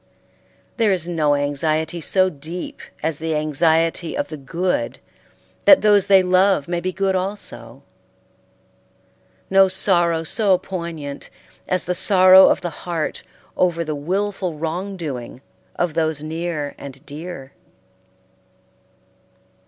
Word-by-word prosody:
There 220 Hz, -3 st, +3 dB
is 175 Hz, -3 st, -1 dB
no 155 Hz, -4 st, +1 dB
anxiety 155 Hz, +3 st, -1 dB
so 185 Hz, +4 st, +2 dB
deep 165 Hz, +1 st, -7 dB, 0.2 s
as 160 Hz, -2 st, -1 dB
the 160 Hz, 0 st, -2 dB
anxiety 160 Hz, +2 st, +1 dB
of -, -, -2 dB
the 155 Hz, -, -6 dB
good 170 Hz, +7 st, -2 dB, 0.7 s
that 290 Hz, -, +7 dB
those 205 Hz, -2 st, +4 dB
they 195 Hz, -1 st, +6 dB
love 185 Hz, -4 st, +2 dB
may 175 Hz, 0 st, -2 dB
be 185 Hz, -, -2 dB
good 195 Hz, +1 st, -1 dB
also; 195 Hz, +2 st, -5 dB, 1.7 s
no 195 Hz, 0 st, +6 dB
sorrow 175 Hz, -3 st, +2 dB
so 195 Hz, +2 st, +2 dB
poignant 170 Hz, -6 st, -7 dB, 0.4 s
as 185 Hz, -1 st, 0 dB
the 180 Hz, -, -1 dB
sorrow 185 Hz, 0 st, +6 dB
of -, -, +2 dB
the 175 Hz, -2 st, -4 dB, 0.2 s
heart 165 Hz, -3 st, -2 dB, 0.3 s
over 170 Hz, -2 st, +1 dB
the 155 Hz, -, -3 dB
willful 185 Hz, +3 st, -2 dB
wrong 180 Hz, +5 st, -4 dB
doing 130 Hz, -8 st, -6 dB, 0.4 s
of 175 Hz, -3 st, -1 dB
those 160 Hz, -2 st, -1 dB
near 160 Hz, -2 st, -4 dB
and 135 Hz, -1 st, -11 dB
dear. 145 Hz, -2 st, -8 dB
170 Hz, 120 wpm, -20 LUFS, 155-185 Hz, 1.7 s, that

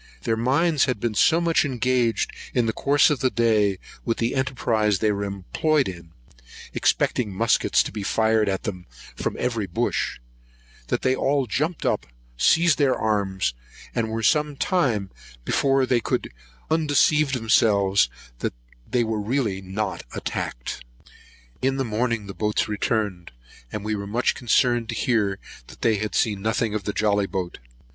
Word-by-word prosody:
Their 115 Hz, -, +1 dB
minds 140 Hz, +7 st, +2 dB
had 130 Hz, -5 st, -2 dB
been 115 Hz, +1 st, -1 dB
so 160 Hz, +10 st, +4 dB
much 170 Hz, -1 st, +2 dB
engaged 125 Hz, -3 st, 0 dB, 0.2 s
in 120 Hz, -2 st, +3 dB
the 110 Hz, -, 0 dB
course 145 Hz, +5 st, +3 dB
of 145 Hz, -, 0 dB
the 130 Hz, -, +2 dB
day 110 Hz, -5 st, +2 dB, 0.3 s
with 115 Hz, -, -1 dB
the 115 Hz, +1 st, 0 dB
enterprise 120 Hz, -6 st, +1 dB
they 110 Hz, +2 st, +1 dB
were 100 Hz, 0 st, -2 dB
employed 130 Hz, -, 0 dB
in, 85 Hz, -3 st, -8 dB, 0.6 s
expecting 115 Hz, -5 st, +1 dB
muskets 110 Hz, +5 st, +2 dB
to -, -, -6 dB
be 105 Hz, -, -5 dB
fired 110 Hz, +1 st, +2 dB
at 95 Hz, -1 st, -2 dB
them 90 Hz, -5 st, -5 dB, 0.3 s
from -, -, -3 dB
every 115 Hz, -5 st, -1 dB
bush, 85 Hz, -, -1 dB, 0.7 s
that -, -, -1 dB
they 130 Hz, -, +3 dB
all 135 Hz, 0 st, +1 dB
jumped 150 Hz, -, -2 dB
up, -, -, 0 dB, 0.3 s
seized 160 Hz, -, +4 dB
their 140 Hz, -3 st, +3 dB
arms, 100 Hz, -, 0 dB, 0.4 s
and 115 Hz, -1 st, -1 dB
were 110 Hz, +1 st, -3 dB
some 150 Hz, +1 st, +2 dB
time 125 Hz, -, 0 dB, 0.3 s
before 135 Hz, -1 st, +2 dB
they 125 Hz, -1 st, +2 dB
could -, -, -2 dB, 0.4 s
undeceive 150 Hz, -2 st, +3 dB
themselves 100 Hz, -, +3 dB, 0.3 s
that -, -, -3 dB, 0.3 s
they 125 Hz, -1 st, +2 dB
were 110 Hz, -2 st, -2 dB
really 110 Hz, -4 st, -1 dB
not 95 Hz, +2 st, -3 dB
attacked. -, -, -4 dB, 0.8 s
In 135 Hz, +1 st, +1 dB
the 135 Hz, -, 0 dB
morning 115 Hz, -1 st, -1 dB
the 100 Hz, -, -7 dB
boats 105 Hz, +1 st, 0 dB
returned; 105 Hz, -, -2 dB, 0.4 s
and 105 Hz, -1 st, -5 dB
we 110 Hz, -, -1 dB
were 100 Hz, -1 st, -5 dB
much 120 Hz, +5 st, +1 dB
concerned 120 Hz, -1 st, +1 dB
to 115 Hz, -, -2 dB
hear 105 Hz, -6 st, +1 dB, 0.3 s
that -, -, -14 dB
they 110 Hz, -2 st, +3 dB
had 105 Hz, +1 st, -3 dB
seen 105 Hz, -3 st, +1 dB
nothing 110 Hz, 0 st, 0 dB
of 105 Hz, -3 st, -3 dB
the 105 Hz, -, 0 dB
jolly 105 Hz, -2 st, +1 dB
boat. 90 Hz, -2 st, -4 dB
115 Hz, 160 wpm, -24 LUFS, 100-130 Hz, 0.8 s, so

